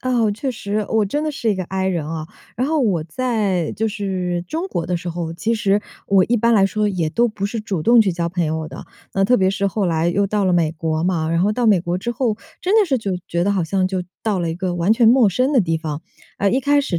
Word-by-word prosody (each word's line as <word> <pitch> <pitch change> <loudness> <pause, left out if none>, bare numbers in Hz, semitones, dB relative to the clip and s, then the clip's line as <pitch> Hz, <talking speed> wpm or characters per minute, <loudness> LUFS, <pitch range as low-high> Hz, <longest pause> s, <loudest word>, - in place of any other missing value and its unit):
哦， 245 -4 +1
确 265 +5 -3
实， 210 -3 -3
我 220 -1 +2
真 290 +10 -2
的 310 - -1
是 250 -5 -3
一 - - +1
个 185 - -3
I 190 +1 -2
人 175 -5 -1
哦。 155 0 -5 0.3
然 250 +3 0
后 310 +1 +1
我 190 - +1
在 200 -3 -1
就 225 - -1
是 185 -4 -2
中 330 +4 -2
国 175 - -3
的 180 +1 -1
时 175 +1 -6
候， 170 -1 -4
其 225 +7 -1
实 205 -2 +1 0.3
我 195 -2 +5
一 240 - +1
般 235 +1 +3
来 200 -3 +5
说 210 +1 0
也 180 -5 -1
都 240 +5 +2
不 205 -2 -3
是 225 +1 -4
主 195 -5 -3
动 235 +6 +6
去 200 -4 +3
交 170 0 -2
朋 175 -1 -1
友 160 0 -2
的。 - - -9 0.3
那 195 - +2
特 250 +5 +4
别 190 -3 +3
是 195 +1 -1
后 195 0 0
来 165 0 +1
又 200 +3 +1
到 205 0 0
了 185 - +2
美 165 -3 +2
国 160 0 -2
嘛， 165 -3 0
然 165 0 +1
后 200 +4 +2
到 245 +2 -1
美 205 -5 +5
国 175 +1 -2
之 235 +6 -3
后， 235 -3 -1 0.2
真 375 +4 +1
的 - - +4
是 275 -8 0
就 200 -4 -3 0.2
觉 170 +1 0
得 200 - +2
好 190 -3 0
像 185 +3 0
就 185 -1 -2 0.2
到 210 -4 0
了 170 -1 -1
一 - - -3
个 180 -1 -2
完 175 +4 +2
全 225 +1 +4
陌 240 -2 +5
生 255 +9 +1
的 260 - +5
地 165 -3 0
方。 155 -1 -5 0.4
哎， 200 - +2
一 255 - +2
开 285 +2 +3
始 185 -11 -2
195 Hz, 295 characters per minute, -20 LUFS, 175-225 Hz, 0.4 s, 动